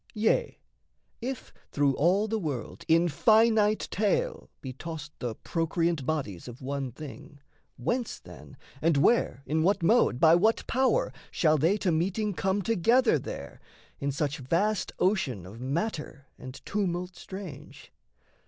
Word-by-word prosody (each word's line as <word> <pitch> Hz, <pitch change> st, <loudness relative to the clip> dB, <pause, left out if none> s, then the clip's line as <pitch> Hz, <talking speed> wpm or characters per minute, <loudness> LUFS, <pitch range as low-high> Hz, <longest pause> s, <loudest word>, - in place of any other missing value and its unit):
Yea, 225 Hz, -, +1 dB, 0.6 s
if 255 Hz, +1 st, -5 dB, 0.2 s
through 145 Hz, -1 st, +2 dB
all 185 Hz, +8 st, +2 dB
the 220 Hz, 0 st, -1 dB
world 140 Hz, -, -5 dB
in 165 Hz, +2 st, +4 dB
finite 215 Hz, +5 st, +3 dB
tale 465 Hz, -, 0 dB
Be 130 Hz, -1 st, -7 dB
tossed 155 Hz, +1 st, -7 dB
the 120 Hz, -3 st, -3 dB
procreant 165 Hz, -3 st, -1 dB
bodies 130 Hz, -, -3 dB
of 120 Hz, +1 st, -9 dB
one 135 Hz, -1 st, -3 dB
thing, 145 Hz, +2 st, -10 dB, 0.4 s
Whence, 235 Hz, -, -2 dB
then, -, -, -13 dB, 0.2 s
and 165 Hz, -3 st, +3 dB
where 140 Hz, -, +2 dB
in 155 Hz, +1 st, 0 dB
what 190 Hz, +2 st, +2 dB
mode, 190 Hz, -, +3 dB
by 160 Hz, +1 st, +6 dB
what 215 Hz, +6 st, +3 dB
power, 265 Hz, -, +1 dB, 0.2 s
Shall 155 Hz, -2 st, +2 dB
they 170 Hz, +8 st, +3 dB
to 190 Hz, -3 st, 0 dB
meeting 195 Hz, +6 st, 0 dB
come 190 Hz, +2 st, 0 dB
together 230 Hz, -, +3 dB
there, -, -, -8 dB, 0.4 s
In 140 Hz, 0 st, -1 dB
such 145 Hz, +1 st, -2 dB
vast 180 Hz, +11 st, 0 dB
ocean 180 Hz, -, 0 dB
of 105 Hz, +6 st, -11 dB
matter 150 Hz, -, -3 dB
and 130 Hz, +1 st, -10 dB
tumult 180 Hz, -3 st, -2 dB
strange? 175 Hz, -8 st, -10 dB
170 Hz, 140 wpm, -28 LUFS, 140-210 Hz, 0.6 s, by